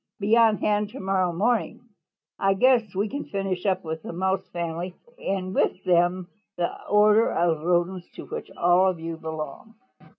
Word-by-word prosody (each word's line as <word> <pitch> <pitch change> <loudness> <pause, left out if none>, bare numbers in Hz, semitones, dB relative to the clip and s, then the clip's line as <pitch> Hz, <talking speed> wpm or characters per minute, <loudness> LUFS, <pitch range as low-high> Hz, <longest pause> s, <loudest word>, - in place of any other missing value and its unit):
Be 210 +2 +3
on 225 -2 +5
hand 210 0 0
to 255 - -9
morrow 190 -2 +1
morning. 230 +6 -1 0.5
I 195 0 +2
guess 230 -3 +3
we 200 +3 0
can 285 +6 -4
finish 195 -1 -3
up 190 - +1
with 160 -1 -5
the - - -7
Mouse 190 +2 -1
family 175 +1 -4 0.2
then - - -13
and 190 -1 -2
with 185 - 0
them 175 +1 +2 0.3
the 175 -1 0 0.2
order 210 +2 +4
of 165 -2 +1
Rodents 175 +1 0
to - - -8
which - - -7
all 175 +2 +4
of 180 -3 -4
you 165 0 -5
belong." 160 +7 -7
185 Hz, 175 wpm, -25 LUFS, 175-210 Hz, 0.5 s, on